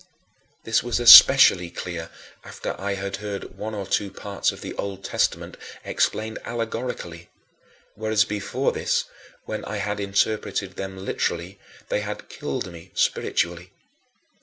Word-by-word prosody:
This 115 - +1
was 120 0 -1
especially 90 -6 +9
clear 85 -1 -6 0.3
after - - -6
I 100 0 -2
had 100 0 -4
heard 100 -1 -6
one 110 +1 -5
or 100 -2 -4
two 100 +1 -1
parts 100 +1 -2
of - - -12
the - - -6
Old 100 -1 -5
Testament - - -1 0.3
explained 110 +1 -1
allegorically 115 -7 -5 0.6
whereas 110 0 +1
before 105 -2 -2
this, - - 0 0.4
when - - -5
I 105 - -4
had 105 +1 -3
interpreted 100 -1 -1
them 95 0 -6
literally, 90 +2 -3 0.3
they - - 0
had - - -6
"killed" 95 - -5
me 85 +2 -12
spiritually. 85 +1 -1
100 Hz, 135 wpm, -24 LUFS, 95-110 Hz, 0.6 s, especially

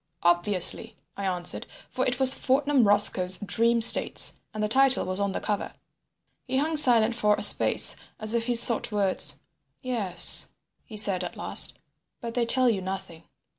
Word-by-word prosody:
"Obviously," 175 +2 0 0.2
I 200 - -9
answered, 180 -2 -5 0.2
for 255 - -5
it 250 0 -6
was 265 0 +7
Fortnum 275 -3 -3
Roscoe's 195 -3 +1
Dream 230 +3 -3
States, 230 - +4 0.2
and 215 0 -8
the - - -3
title 265 +3 -1
was 185 +1 -6
on 200 0 -4
the 190 - -7
cover. 205 -2 -7 0.8
He 260 - -5
hung 310 +3 -4
silent 240 -6 +3
for 210 -3 -3
a - - -8
space - - +4 0.2
as 215 0 0
if 230 0 -5
he 245 - -3
sought 230 -1 +6
words. 190 -8 -1 0.5
"Yes," 220 -8 +3 0.4
he 220 - -15
said 200 -3 +2
at - - -11
last, - - -3 0.4
"but 235 -2 -10
they 240 -1 -5
tell 255 +2 -1
you 215 -5 -3
nothing." 185 -3 -11
215 Hz, 170 wpm, -22 LUFS, 195-245 Hz, 0.8 s, was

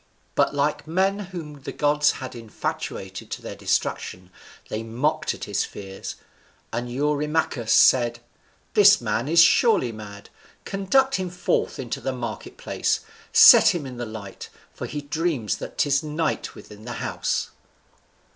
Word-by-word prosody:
But - - +2
like 145 +2 0
men 190 +4 +1
whom 150 -6 -8
the - - -6
gods 150 0 +2
had 130 -1 -7
infatuated 105 -4 -5
to - - -5
their - - -6
destruction, 90 0 -2 0.4
they 110 - -4
mocked 150 +8 -1
at - - -10
his 100 - -1
fears, 95 -1 -8 0.6
and 120 +1 -3
Eurymachus 150 -3 0
said, 120 -2 +5 0.6
"This 205 -1 +7
man 115 +3 -1
is 165 +2 +4
surely 170 - +5
mad; 105 -2 -10 0.3
conduct 235 +7 +2
him 185 -1 -3
forth 180 +1 -1
into 125 -3 -5
the 135 - -2
market 120 -3 -6
place, - - -1 0.3
set - - +8
him 160 -5 -3
in 130 -2 -8
the 120 -1 -4
light, 110 -3 -9 0.2
for - - -6
he 150 - -5
dreams 145 -6 -1
that - - -8
'tis 140 -1 +2
night 155 0 -2
within 105 0 -13
the 120 - -5
house." - - -2
140 Hz, 145 wpm, -24 LUFS, 115-160 Hz, 0.6 s, set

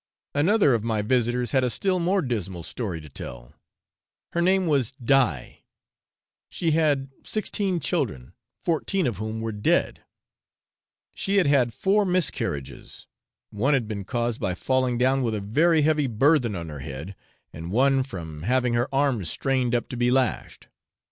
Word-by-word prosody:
Another 165 - +3
of 115 -3 0
my 110 -2 -1
visitors 120 +1 +1
had 130 -1 +2
a 125 - +1
still 185 - 0
more 185 +2 +1
dismal 95 -9 -3
story 95 -4 -4
to 75 - -12
tell; - - -9 0.8
her 170 - +1
name 190 +1 +3
was 135 -6 +1
Die; 125 - +1 0.9
she 165 -2 -1
had 150 -3 +2
had 135 - -11
sixteen 200 -4 -1
children, 65 - -2 0.3
fourteen 175 +2 0
of 120 -7 -1
whom 110 +2 -4
were 115 0 -2
dead; 105 -1 0 1.1
she 195 - -1
had 190 - +4
had 135 -4 +3
four 200 - +2
miscarriages, 175 - -3 0.5
one 130 +8 +2
had 120 -5 -1
been 105 -2 -4
caused 120 +2 -2
by 95 -4 -1
falling 130 +3 0
down 130 +2 +2
with 115 -3 0
a - - -2
very 155 +11 +2
heavy 150 -2 +2
burthen 125 -1 +2
on 85 -2 -5
her 75 -2 -7
head, 70 +8 -7 0.4
and 80 +2 -7
one 135 +4 +3
from 85 - -7
having 125 +5 +1
her 120 +4 +1
arms 135 - +1
strained 130 - 0
up 120 - -1
to - - -6
be 120 0 +2
lashed. 130 0 -1
125 Hz, 160 wpm, -25 LUFS, 105-145 Hz, 1.1 s, had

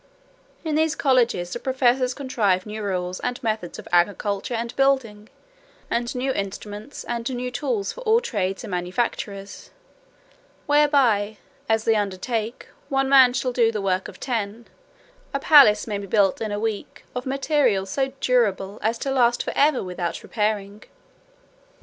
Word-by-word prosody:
In 315 -2 -2
these 315 +1 +2
colleges 235 -10 +1
the - - -4
professors 255 -1 +1
contrive 215 -9 0
new 215 0 -6
rules 185 -2 -2
and 245 0 -2
methods 215 -6 -2
of - - -10
agriculture 200 +5 +1
and 235 +1 -4
building, 245 -6 +1 0.6
and 235 +1 -1
new 260 +2 0
instruments, 205 +3 -6
and 235 -1 -3 0.3
tools 245 -8 -2
for - - -10
all 455 -1 +4
trades 195 - -2
and - - -7
manufactures; 195 +2 -3 1.0
whereby, 270 -8 +3 0.3
as 220 0 +2
they 225 - +3
undertake, 215 +3 -2 0.2
one 270 -1 +1
man 265 -2 +7
shall 255 0 -1
do 230 -2 +3
the 215 - -3
work 190 -1 -1
of - - -12
ten; 230 -2 -3 0.7
a - - +1
palace 270 -9 +6
may 205 -3 -3
be 200 - -7
built 200 -1 +2
in 215 -2 -2
a 205 - -2
week, 220 -2 -4
of 250 +1 -5
materials 265 -8 +1
so 270 -1 0
durable 210 -5 +1
as 225 +2 0
to 270 - -3
last 240 -2 +2
for - - -4
ever 285 -2 +3
without 180 -2 -4
repairing. 210 -1 -2
225 Hz, 150 wpm, -23 LUFS, 200-260 Hz, 1.0 s, man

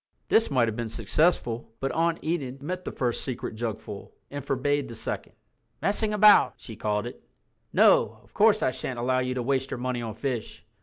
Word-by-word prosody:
This 225 - +4
might 125 -4 +3
have 110 - -2
been 115 -1 -3
successful, 115 - 0
but 135 - -1
Aunt 165 0 0
Enid 140 -5 -3
met 180 +4 -4
the - - -3
first 120 -2 -1
secret 125 -3 -4
jugful—and 110 +4 -6
forbade 145 +1 0
the 115 - -8
second. - - -4 0.5
"Messing 210 +1 +1
about," 210 0 +6
she 115 - -10
called 105 0 -1
it. 120 - -8 0.5
"No, - - +4
of - - -26
course - - +4
I - - +2
shan't 130 - -5
allow 130 +2 +1
you 125 0 -1
to 125 - -2
waste 135 +1 0
your - - -4
money 125 0 -2
on 110 -3 -5
fish." 120 -1 -4
130 Hz, 190 wpm, -27 LUFS, 115-145 Hz, 0.5 s, about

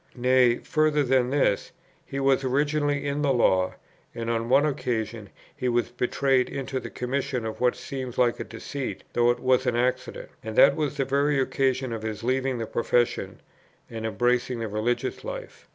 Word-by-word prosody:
Nay, 125 -1 +4
further 155 -1 +1
than 130 -1 +2
this, 135 -7 +1 0.3
he 135 - -5
was 135 0 +2
originally 145 +2 0
in 140 +1 -1
the 145 -2 +2
Law, 95 -7 +2 0.4
and 115 0 -2
on 115 0 -1
one 135 +3 +5
occasion 115 -7 -2 0.3
he 125 -3 -1
was 120 0 +1
betrayed 125 +1 +1
into 135 -1 -3
the - - -7
commission 130 -1 -2
of 110 +1 -5
what 125 -1 +3
seemed 130 -3 -6
like 120 -2 +2
a - - -2
deceit, 125 +4 -6
though 120 0 +3
it 120 0 +1
was 130 0 +2
an 120 - +1
accident; 125 +1 -1
and 110 -1 -5
that - - +7
was 150 -3 -2
the 135 - +1
very 140 +1 +1
occasion 130 -2 0
of 115 - -4
his 110 0 -5
leaving 130 +1 0
the 115 - -3
profession 120 +1 0 0.5
and 110 -1 -4
embracing 120 +3 0
the 115 -1 -3
religious 120 - -2
life. - - -8
125 Hz, 180 wpm, -26 LUFS, 120-135 Hz, 0.5 s, that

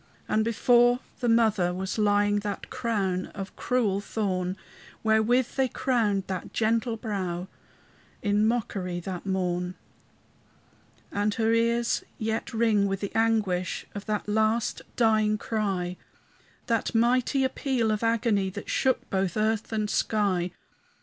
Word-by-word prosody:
And 220 - +2
before 240 +2 +4 0.2
the 245 - 0
mother 215 -6 +3
was 190 +3 -3
lying 205 0 +3
That 205 -1 -5
crown 195 -6 -1
of 195 0 -6
cruel 215 -6 0
thorn, 190 -3 -2 0.5
Wherewith 225 +3 +3
they 265 -1 +3
crowned 225 -7 0
that 185 -2 -5
gentle 230 +1 +1
brow 190 -5 -3 0.8
In 205 +1 +3
mockery 195 -6 -1
that 185 +1 -6
morn. 180 -1 -1 1.4
And 205 +1 0
her 225 0 +2
ears 235 +1 +1
yet 220 +1 -2
ring 220 -3 +2
with 195 -1 -2
the 200 - -4
anguish 210 -6 +1
Of 205 0 -7
that 210 -1 -2
last 220 +2 +1
dying 215 -2 +3
cry, 195 -5 -2 0.7
That 230 -1 0
mighty 250 +4 +3
appeal 260 -3 0
of 215 - -1
agony 225 -4 +1
That 200 +2 -6
shook 260 -2 +1
both 190 0 0
earth 215 0 0
and 215 -1 0
sky. 200 -5 +1
215 Hz, 130 wpm, -27 LUFS, 195-230 Hz, 1.4 s, before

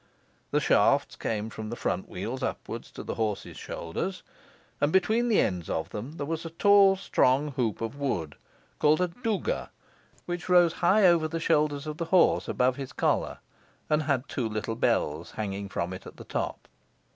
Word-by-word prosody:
The - - +2
shafts - - +3
came 110 0 -3
from 110 0 -6
the 120 - -4
front - - -2
wheels - - -4
upwards - - -4
to - - -7
the - - -4
horse's 110 -3 -3
shoulders, 135 - -5 0.6
and 145 - +3
between 220 +6 +3
the 220 - +4
ends 90 -3 0
of 80 - -2
them 120 +8 -6
there 145 -3 -4
was 165 +2 -3
a 165 - -5
tall 195 +3 +5
strong 145 -6 +2
hoop 120 -6 -1
of 115 +5 -4
wood, 85 - -2 0.5
called 150 +1 +4
a 180 -1 +1
douga, 230 - -2 0.6
which 175 +1 -5
rose 175 -2 +6
high 195 +4 +5
over 170 -3 +5
the 165 +1 -3
shoulders 150 -3 +1
of 155 0 -5
the 170 - -2
horse, 175 +1 +3
above 125 +1 +1
his 135 -2 -6
collar, - - 0 0.5
and 150 0 +3
had 140 -3 0
two 120 -4 -2
little 110 +1 -3
bells 80 -7 0
hanging 100 -2 -4
from 85 -1 -3
it 95 - -9
at - - -12
the - - -9
top. - - -4
145 Hz, 180 wpm, -28 LUFS, 110-175 Hz, 0.6 s, rose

